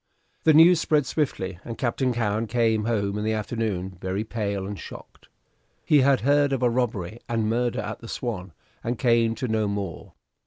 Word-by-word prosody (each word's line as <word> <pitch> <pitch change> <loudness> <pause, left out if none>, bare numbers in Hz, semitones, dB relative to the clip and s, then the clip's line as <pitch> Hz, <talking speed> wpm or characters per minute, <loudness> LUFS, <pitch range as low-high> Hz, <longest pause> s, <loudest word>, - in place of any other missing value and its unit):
The 160 - +6
news 165 +1 +7
spread 150 -3 +2
swiftly, 95 - -2
and 115 - -7
Captain 130 +1 0
Cowen 115 -1 -1
came 110 -2 +1
home 105 -3 0
in - - -3
the 110 0 0
afternoon, 100 -4 -3
very 95 +3 -2
pale 100 -4 -3
and 100 0 -6
shocked. - - -12 0.6
He 150 -2 +5
had 135 0 +3
heard 145 +2 +3
of 130 -2 -1
a 120 - +3
robbery 115 -4 -2
and 115 -2 0
murder 120 +2 0
at 105 0 -5
the 115 - -10
"Swan," 100 -7 -4 0.3
and 120 +1 -2
came 115 -2 +2
to 130 - -3
know 110 -2 0
more. 100 -4 -5
115 Hz, 185 wpm, -25 LUFS, 105-125 Hz, 0.6 s, news